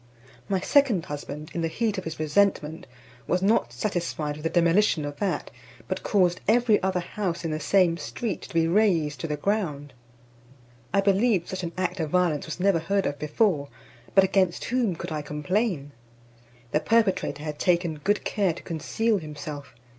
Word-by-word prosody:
My 195 Hz, -1 st, +1 dB
second 250 Hz, -, +3 dB
husband, 145 Hz, +2 st, -7 dB
in 170 Hz, -, -2 dB
the 165 Hz, -, +1 dB
heat 210 Hz, +3 st, -1 dB
of 185 Hz, -, -9 dB
his 160 Hz, -1 st, -5 dB
resentment, 155 Hz, -1 st, +1 dB, 0.4 s
was 180 Hz, +1 st, +1 dB
not 195 Hz, -, +2 dB
satisfied 155 Hz, -, -2 dB
with 150 Hz, -, -10 dB
the 165 Hz, -, +1 dB
demolition 170 Hz, -1 st, +3 dB
of 145 Hz, 0 st, -6 dB
that, 200 Hz, -, -2 dB, 0.4 s
but -, -, -3 dB
caused 185 Hz, -3 st, +2 dB
every 225 Hz, -1 st, +4 dB
other 185 Hz, -1 st, 0 dB
house 175 Hz, -2 st, -3 dB
in 165 Hz, -, -1 dB
the 155 Hz, -, -2 dB
same 175 Hz, +1 st, +3 dB
street 190 Hz, +5 st, -4 dB
to -, -, -11 dB
be 165 Hz, 0 st, +3 dB
razed 170 Hz, -6 st, +2 dB
to 165 Hz, -, -3 dB
the 150 Hz, -1 st, -2 dB
ground. 150 Hz, -7 st, -2 dB, 1.0 s
I 200 Hz, -, +3 dB
believe 195 Hz, -1 st, +2 dB
such 185 Hz, -, -4 dB
an 170 Hz, -1 st, -4 dB
act 185 Hz, 0 st, -1 dB
of 160 Hz, -2 st, -1 dB
violence 170 Hz, -4 st, +1 dB
was 160 Hz, -, -6 dB
never 190 Hz, -2 st, +3 dB
heard 195 Hz, +4 st, 0 dB
of 145 Hz, -, -2 dB
before; 150 Hz, -1 st, +1 dB, 0.5 s
but 195 Hz, -, +8 dB
against 190 Hz, -2 st, +1 dB
whom 235 Hz, -7 st, 0 dB
could 170 Hz, +1 st, -6 dB
I 155 Hz, -1 st, -2 dB
complain? 150 Hz, +1 st, -1 dB, 0.8 s
The 150 Hz, -, +3 dB
perpetrator 190 Hz, -7 st, +1 dB
had 150 Hz, -1 st, -5 dB
taken 170 Hz, -3 st, +1 dB
good 205 Hz, +1 st, +1 dB
care 195 Hz, -5 st, +1 dB
to -, -, -11 dB
conceal 210 Hz, +6 st, 0 dB
himself. 145 Hz, -4 st, -8 dB
175 Hz, 175 wpm, -26 LUFS, 155-200 Hz, 1.0 s, but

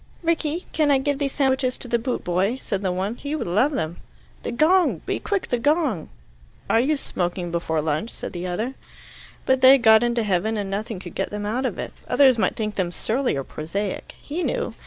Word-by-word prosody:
"Rickie, 330 Hz, 0 st, 0 dB
can 305 Hz, -2 st, +2 dB
I 280 Hz, -, +5 dB
give 280 Hz, +1 st, -1 dB
these 275 Hz, -2 st, -1 dB
sandwiches 265 Hz, -2 st, +1 dB
to -, -, -3 dB
the 235 Hz, 0 st, +1 dB
boot 250 Hz, +2 st, -2 dB
boy?" 190 Hz, +7 st, +1 dB
said 200 Hz, -6 st, -3 dB
the 190 Hz, -2 st, 0 dB
one. 195 Hz, +6 st, -2 dB
"He 290 Hz, +1 st, -4 dB
would 310 Hz, -, -3 dB
love 215 Hz, -, +2 dB
them." 160 Hz, -, -2 dB, 0.4 s
"The -, -, -4 dB
gong! 335 Hz, +9 st, +3 dB
Be -, -, -1 dB
quick! 400 Hz, -2 st, -2 dB
The 245 Hz, -, +1 dB
gong!" 290 Hz, -, +1 dB, 0.6 s
"Are 225 Hz, -, +3 dB
you 290 Hz, +5 st, +2 dB
smoking 175 Hz, -7 st, -3 dB
before 160 Hz, -2 st, -1 dB
lunch?" 155 Hz, +8 st, -1 dB
said -, -, -7 dB
the 175 Hz, 0 st, -4 dB
other. 220 Hz, +9 st, -2 dB, 0.7 s
But 260 Hz, 0 st, +2 dB
they 260 Hz, +1 st, +9 dB
had 270 Hz, -3 st, +3 dB
got 220 Hz, -1 st, +7 dB
into 240 Hz, -1 st, +1 dB
heaven, 210 Hz, +2 st, 0 dB
and 200 Hz, -2 st, -3 dB
nothing 215 Hz, +1 st, -3 dB
could 175 Hz, -2 st, -9 dB
get 195 Hz, -, -2 dB
them 205 Hz, 0 st, -4 dB
out 250 Hz, +5 st, 0 dB
of -, -, -5 dB
it. -, -, -5 dB
Others 260 Hz, -4 st, +5 dB
might -, -, +1 dB
think 215 Hz, -2 st, -3 dB
them 180 Hz, -3 st, 0 dB
surly 245 Hz, -, -1 dB
or 135 Hz, -, -2 dB
prosaic. 190 Hz, +9 st, -4 dB
He 315 Hz, +5 st, -4 dB
knew. 480 Hz, +6 st, -1 dB
230 Hz, 220 wpm, -23 LUFS, 190-275 Hz, 0.7 s, they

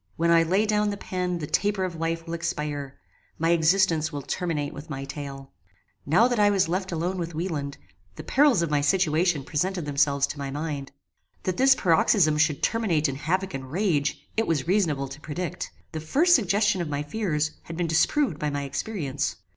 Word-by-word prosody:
When 170 Hz, +1 st, +2 dB
I 165 Hz, 0 st, +6 dB
lay 190 Hz, +6 st, +2 dB
down 210 Hz, -1 st, +1 dB
the 200 Hz, -, -3 dB
pen 180 Hz, -2 st, -3 dB
the 155 Hz, -, -4 dB
taper 200 Hz, +4 st, 0 dB
of 180 Hz, -2 st, -3 dB
life 165 Hz, 0 st, -2 dB
will 165 Hz, -, -6 dB
expire: 145 Hz, -4 st, -3 dB, 0.4 s
my 165 Hz, +1 st, +1 dB
existence 165 Hz, -1 st, +3 dB
will 145 Hz, -2 st, -5 dB
terminate 155 Hz, -4 st, -2 dB
with 150 Hz, +3 st, -10 dB
my 135 Hz, -2 st, -5 dB
tale. 140 Hz, -1 st, -7 dB, 0.6 s
Now 185 Hz, +11 st, +5 dB
that 245 Hz, -3 st, -1 dB
I 205 Hz, 0 st, +5 dB
was 195 Hz, -4 st, +2 dB
left 185 Hz, +2 st, -2 dB
alone 175 Hz, +3 st, -2 dB
with 170 Hz, -1 st, -4 dB
Wieland, 155 Hz, -5 st, -3 dB, 0.4 s
the -, -, -8 dB
perils 270 Hz, -, +3 dB
of 165 Hz, -, -2 dB
my 145 Hz, -1 st, +2 dB
situation 160 Hz, 0 st, +2 dB
presented 175 Hz, +4 st, -2 dB
themselves 140 Hz, -1 st, +2 dB
to 145 Hz, +1 st, -7 dB
my 140 Hz, -1 st, -4 dB
mind. 145 Hz, -1 st, -4 dB, 0.5 s
That 185 Hz, -1 st, -2 dB
this 270 Hz, +1 st, +6 dB
paroxysm 165 Hz, -4 st, +3 dB
should 150 Hz, -2 st, +1 dB
terminate 180 Hz, -10 st, +1 dB
in 135 Hz, -, -3 dB
havock 185 Hz, +6 st, -1 dB
and 135 Hz, -1 st, -6 dB
rage 160 Hz, -6 st, 0 dB
it 225 Hz, -, 0 dB
was 160 Hz, -3 st, 0 dB
reasonable 165 Hz, -8 st, +1 dB
to 135 Hz, +3 st, -10 dB
predict. 170 Hz, +3 st, -5 dB, 0.2 s
The 160 Hz, -, -4 dB
first 295 Hz, -, +3 dB
suggestion 205 Hz, -3 st, +2 dB
of 165 Hz, -, -3 dB
my 145 Hz, 0 st, -2 dB
fears 150 Hz, -3 st, -1 dB
had 165 Hz, -, -7 dB
been 175 Hz, -, 0 dB
disproved 165 Hz, -, +1 dB
by 150 Hz, -, -1 dB
my 145 Hz, 0 st, -3 dB
experience. 140 Hz, -3 st, -3 dB
165 Hz, 195 wpm, -26 LUFS, 145-190 Hz, 0.6 s, I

